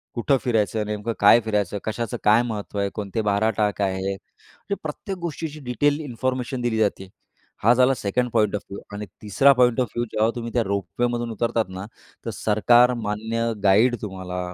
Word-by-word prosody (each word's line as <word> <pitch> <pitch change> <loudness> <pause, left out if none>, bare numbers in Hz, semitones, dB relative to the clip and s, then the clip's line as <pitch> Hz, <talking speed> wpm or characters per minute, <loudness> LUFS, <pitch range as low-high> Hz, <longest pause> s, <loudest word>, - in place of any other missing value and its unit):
कुठं 135 +3 +2
फिरायचं, 110 -3 0
नेमकं 105 +2 -3
काय 105 +3 +7
फिरायचं 105 -2 -1
कशाचं 110 0 -3
काय 110 +2 +5
महत्त्व 105 -2 -5
आहे. 100 0 0
कोणते 105 +1 -3
12 105 +1 +1
टाक 105 -1 0
आहे. 95 0 -1
म्हणजे 105 - -9
प्रत्येक 185 +5 -5
गोष्टीची 160 -2 -5
डिटेल 145 +5 +1
इन्फॉर्मेशन 130 -1 -3
दिली 120 -2 0
जाते. 100 -3 0 0.5
हा 115 +3 +6
झाला 130 +2 +4
सेकंड 125 +4 -1
पॉइंट 105 -3 +2
ऑफ 105 - -3
व्ह्यू 100 - -6
आणि 105 +1 -5 0.2
तिसरा 110 +7 +4
पॉइंट 125 -1 +4
ऑफ 125 - 0
व्ह्यू 120 - 0
जेव्हा 110 +1 +2
तुम्ही 115 -1 -5
त्या 120 - +2
रोपवेमधून 115 +5 -2
उतरतात 115 0 0
ना, 95 +1 -7 0.4
तर - - -2
सरकार 120 +4 +4
मान्य 110 +2 -2
गाईड 110 +5 +4
तुम्हाला 95 -3 -5
110 Hz, 175 wpm, -23 LUFS, 105-120 Hz, 0.5 s, काय